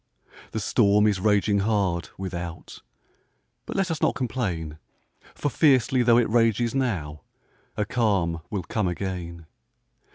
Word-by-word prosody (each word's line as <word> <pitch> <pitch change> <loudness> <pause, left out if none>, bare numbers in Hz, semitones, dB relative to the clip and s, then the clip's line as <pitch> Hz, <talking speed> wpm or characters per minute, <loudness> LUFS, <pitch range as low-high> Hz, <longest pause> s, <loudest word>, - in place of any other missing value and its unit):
The 110 - -4
storm 105 0 +3
is 105 -3 +2
raging 105 0 +2
hard, 100 -5 0
without; 85 -3 -6 0.9
But - - -5
let 195 -3 0
us 160 - -3
not - - +2
complain, 95 - -3 0.6
For 145 - -1
fiercely 130 -4 +3
tho' 120 -1 +5
it 120 - +3
rages 115 0 +2
now, 90 - -2 0.6
A 105 - 0
calm 95 -8 0
will 100 -4 -3
come 105 +3 -1
again. 90 -2 -5
105 Hz, 130 wpm, -25 LUFS, 85-120 Hz, 0.9 s, tho